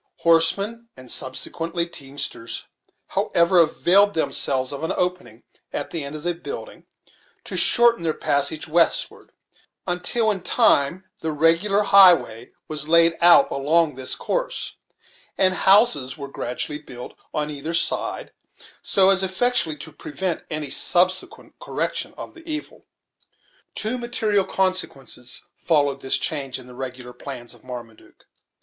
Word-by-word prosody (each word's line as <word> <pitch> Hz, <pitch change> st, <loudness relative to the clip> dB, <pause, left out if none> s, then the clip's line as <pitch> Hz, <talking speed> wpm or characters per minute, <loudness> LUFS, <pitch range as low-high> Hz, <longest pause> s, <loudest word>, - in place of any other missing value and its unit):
Horsemen, 200 Hz, +8 st, +2 dB
and 130 Hz, -1 st, -8 dB
subsequently 165 Hz, +6 st, -2 dB
teamsters, 140 Hz, -7 st, -5 dB, 0.5 s
however, 170 Hz, +2 st, +2 dB
availed 190 Hz, +5 st, +4 dB
themselves 135 Hz, -4 st, -1 dB
of 140 Hz, -, -6 dB
an 160 Hz, -, -1 dB
opening, 180 Hz, -10 st, -3 dB, 0.3 s
at 145 Hz, -, -5 dB
the 165 Hz, -3 st, -3 dB
end 140 Hz, +2 st, -6 dB
of 150 Hz, -, -8 dB
the 175 Hz, 0 st, 0 dB
building, 460 Hz, -, -9 dB, 0.6 s
to -, -, -7 dB
shorten 235 Hz, -3 st, +6 dB
their 160 Hz, -2 st, -1 dB
passage 140 Hz, +2 st, 0 dB
westward, 165 Hz, +1 st, 0 dB, 0.5 s
until 190 Hz, +5 st, +1 dB
in 195 Hz, -3 st, -4 dB
time 185 Hz, -, +2 dB
the 160 Hz, -, -3 dB
regular 165 Hz, +7 st, +2 dB
highway 180 Hz, -, +5 dB, 0.2 s
was 150 Hz, -1 st, -2 dB
laid 165 Hz, 0 st, +4 dB
out 170 Hz, -5 st, +6 dB
along 150 Hz, +3 st, +1 dB
this 130 Hz, 0 st, -4 dB
course, -, -, -3 dB, 0.6 s
and 185 Hz, -1 st, +3 dB
houses 185 Hz, -, +3 dB
were 140 Hz, -2 st, -7 dB
gradually 145 Hz, +2 st, -4 dB
built 125 Hz, -5 st, -10 dB, 0.2 s
on 150 Hz, 0 st, -3 dB
either 150 Hz, +3 st, -4 dB
side, -, -, -2 dB, 0.5 s
so 195 Hz, 0 st, +4 dB
as 190 Hz, -1 st, +3 dB
effectually 190 Hz, -4 st, 0 dB
to 160 Hz, -, -10 dB
prevent 165 Hz, +5 st, -4 dB
any 155 Hz, -3 st, -4 dB
subsequent 185 Hz, +1 st, 0 dB
correction -, -, -3 dB
of -, -, -9 dB
the 335 Hz, -, -15 dB
evil. 305 Hz, -1 st, -6 dB, 0.9 s
Two 225 Hz, +4 st, -2 dB
material 220 Hz, -5 st, 0 dB
consequences 140 Hz, -10 st, -2 dB
followed 145 Hz, -4 st, 0 dB
this 130 Hz, -, +1 dB
change 140 Hz, -5 st, -1 dB
in 130 Hz, -, -11 dB
the 125 Hz, -, -14 dB
regular 125 Hz, -1 st, -8 dB
plans 125 Hz, -1 st, -8 dB
of -, -, -19 dB
Marmaduke. 120 Hz, -3 st, -11 dB
165 Hz, 135 wpm, -22 LUFS, 140-190 Hz, 0.9 s, shorten